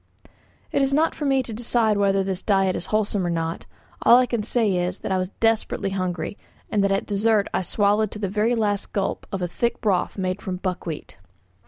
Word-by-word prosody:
It - - +1
is 275 0 +2
not 320 +2 +2
for 295 - -4
me 270 -1 +2
to 235 - -6
decide 225 -1 +1
whether 195 -1 +2
this 190 -1 -3
diet 195 -2 +2
is - - -5
wholesome 210 -2 0
or 175 - -1
not; 165 0 -3 0.3
all 240 - +7
I 255 - +4
can 235 -3 -2
say 215 -2 +1
is, 180 +1 -1
that - - -5
I 190 - +2
was 185 0 -2
desperately 225 -3 +1
hungry, 185 0 -3 0.3
and 205 -2 +2
that 200 - +2
at 195 - 0
dessert 210 0 +2
I - - +1
swallowed 205 +3 +2
to - - -9
the 205 -2 -2
very 215 +5 +1
last 205 -3 -1
gulp 195 -2 -2
of 190 -2 -3
a - - 0
thick 235 +7 -1
broth 200 -4 0
made 185 0 -2
from 185 - -3
buckwheat. 180 -4 -5
200 Hz, 215 wpm, -23 LUFS, 185-225 Hz, 0.3 s, all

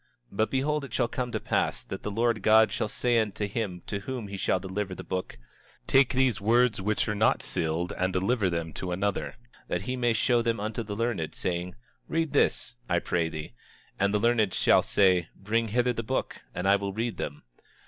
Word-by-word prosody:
27:15 - - -12
But 110 - +2
behold, 145 +3 0
it 130 -4 -9
shall - - +2
come 125 -3 -3
to - - -1
pass - - -1
that - - -7
the - - -3
Lord 115 +1 +1
God 110 0 +5
shall - - -1
say 120 +2 +1
unto 105 -1 -1
him 95 -4 -4
to 100 - -3
whom 120 -1 -5
he 100 - -5
shall 95 -1 +1
deliver 95 +1 -4
the - - -8
book: 95 0 -4 0.5
Take 135 -1 +4
these 130 -5 +2
words 115 0 +3
which 105 +2 0
are 105 - 0
not 105 +1 +2
sealed 80 +2 -1
and 95 0 0
deliver 95 +2 +1
them 85 -2 -3
to 90 +4 -4
another, 95 +3 -1 0.3
that 90 - -2
he 125 +5 -2
may 120 -2 +2
show 120 +2 +2
them 115 -2 0
unto 110 +2 -3
the 105 -2 -5
learned, 110 -8 -2
saying: 90 0 -3 0.3
Read 160 -2 -1
this, 130 -4 +2 0.2
I 85 - +3
pray 85 -1 0
thee. 75 -5 -7 0.5
And 100 0 +2
the 105 - +2
learned 110 -3 +2
shall - - +5
say: 90 -4 +3
Bring 115 +3 0
hither 125 +3 +1
the 115 - -3
book, 130 +4 -3
and 90 - -1
I 100 +1 +6
will 100 -1 -4
read 115 +2 -2
them. 75 - -5
105 Hz, 210 wpm, -28 LUFS, 95-120 Hz, 0.5 s, I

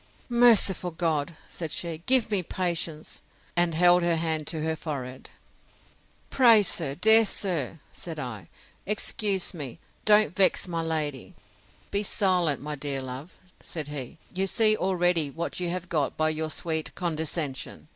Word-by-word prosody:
Merciful 230 -7 +4
God! 160 -2 -2
said 165 -3 -6
she, 165 -2 -1
give 255 -4 +3
me 200 -3 +2
patience! 170 -3 -3 0.3
and 175 -2 +2
held 175 +1 +5
her 170 -1 +2
hand 160 -2 -2
to 160 -2 -2
her 160 0 -1
forehead. 135 -5 -6 1.0
Pray, 230 -5 +6
sir, 160 -7 -2
dear 220 +6 +7
sir, 175 - -1 0.2
said 165 -2 -7
I, 110 - -6 0.4
excuse 205 -2 0
me, 145 -8 -7 0.3
don't 210 -6 +4
vex 190 -1 +4
my 170 -2 -2
lady:—Be 160 +5 -5
silent, 180 -8 +1
my 150 0 -4
dear 140 -2 -3
love, 130 +6 -8 0.3
said 155 -3 -5
he; 140 -3 -7 0.2
you 190 +1 0
see 215 +1 +3
already 175 -5 +1
what 165 +6 -4
you 175 -1 -2
have 180 +1 -4
got 150 -5 -1
by 155 0 +2
your 155 0 -3
sweet 160 0 -3
condescension. 160 -5 -3
165 Hz, 145 wpm, -26 LUFS, 150-185 Hz, 1.0 s, dear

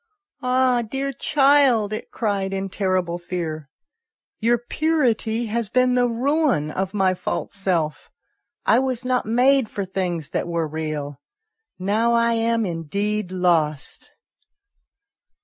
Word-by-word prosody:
" - - -71
Ah, 250 -1 +2
dear 270 +5 -3
child," 270 -7 +3
it 215 - -5
cried 200 -4 -2
in 195 0 -3
terrible 185 -3 -1
fear, 165 -4 -5 0.4
" - - -64 0.3
your 235 +2 +3
purity 240 -4 0
has 225 -1 -2
been 255 +1 +3
the 245 0 +3
ruin 255 - +1
of 190 +3 -3
my 190 -2 +3
false 180 - -4
self. 175 -6 -1 0.6
I 235 - +5
was 255 -2 -2
not 250 -3 0
made 250 +1 +3
for 200 - -4
things 180 -5 -3
that - - -2
were 170 -2 -1
real; 150 -2 -5 0.6
now 215 +5 +1
I 235 0 +3
am 230 0 +1
indeed 200 +4 -2
lost." 165 -5 0
210 Hz, 130 wpm, -22 LUFS, 180-245 Hz, 0.6 s, I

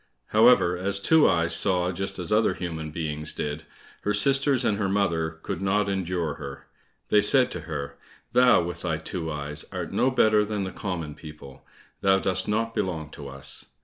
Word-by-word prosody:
However, 110 -5 +5
as 100 +2 +1
Two 160 +9 +4
eyes 85 0 +2
saw 90 -1 +2
just 95 +2 -3
as 90 -3 -4
other 110 +1 +2
human 80 -3 -5
beings 75 -1 -3
did, 75 +1 -4 0.4
her 105 - -1
sisters 135 +3 +3
and 100 - +1
her 100 -2 0
mother 85 -5 0
could 85 - -4
not 100 +1 +1
endure 90 -4 -2
her. 70 -1 -8 0.4
They 105 - +5
said 125 +4 +4
to - - -5
her, 70 -3 -5 0.3
"Thou, 125 -6 +5
with 85 0 -6
thy 80 -4 -1
two 80 +1 -5
eyes, 75 0 -2
art - - -5
no 130 - +2
better 110 -5 +3
than 105 -1 -3
the 95 - -4
common 85 -6 -5
people; 75 -3 -13 0.3
thou 95 0 +4
dost 95 -1 -1
not 115 +2 -1
belong 80 -7 -3
to 70 -3 -9
us!" 70 0 -4
90 Hz, 180 wpm, -25 LUFS, 80-105 Hz, 0.4 s, However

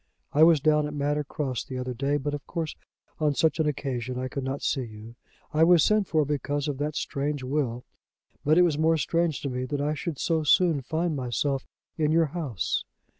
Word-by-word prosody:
I 150 - +3
was 160 -1 +7
down 150 +1 +3
at 150 - -6
Manor 145 +1 0
Cross 135 -5 -3
the 130 - -6
other 125 0 -3
day; 140 +4 0
but 145 +1 -3
of 145 - -6
course 165 -3 -3 0.4
on 150 -2 +1
such 160 +1 +2
an 155 - +2
occasion 130 -3 -3
I 130 0 -3
could 140 +1 -4
not 135 +2 -3
see 135 - 0
you. 110 -1 -9 0.4
I 155 +1 +4
was 170 -1 +6
sent 215 -2 +3
for 155 -2 +2
because 145 0 -2
of 140 -2 -3
that 150 +1 -2
strange 145 -2 -2
will; 130 -3 -1 0.6
but 155 +3 +4
it 180 - +7
was 155 -4 +1
more 160 +1 +3
strange 165 -2 0
to 140 - -2
me 125 0 -2
that 145 +2 -3
I 145 +2 0
should 155 0 -4
so 165 +2 +1
soon 155 -1 +3
find 160 +4 -1
myself 130 +1 -1 0.3
in 150 -1 +2
your 165 +1 +4
house. 140 - -2
145 Hz, 215 wpm, -27 LUFS, 135-155 Hz, 0.6 s, was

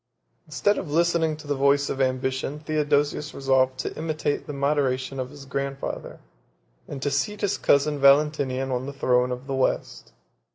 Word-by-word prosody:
Instead 155 +8 +1
of 165 - -6
listening 165 0 +1
to 155 - -12
the 145 - -1
voice 140 +1 +3
of 135 - -2
ambition, 130 +2 -1
Theodosius 150 -1 0
resolved 130 -1 +2
to - - -5
imitate 155 -2 -2
the - - -4
moderation 135 -2 0
of 130 0 -3
his 145 -1 -12
grandfather, 140 0 -4 0.7
and 140 - -6
to 145 - 0
seat 140 +10 -1
his 205 0 0
cousin 145 +1 +2
Valentinian 140 -2 +3
on 125 +1 -2
the 140 - -5
throne 125 -2 +2
of 125 +1 -5
the 135 - -4
West. 130 -1 -1
140 Hz, 165 wpm, -25 LUFS, 130-150 Hz, 0.7 s, voice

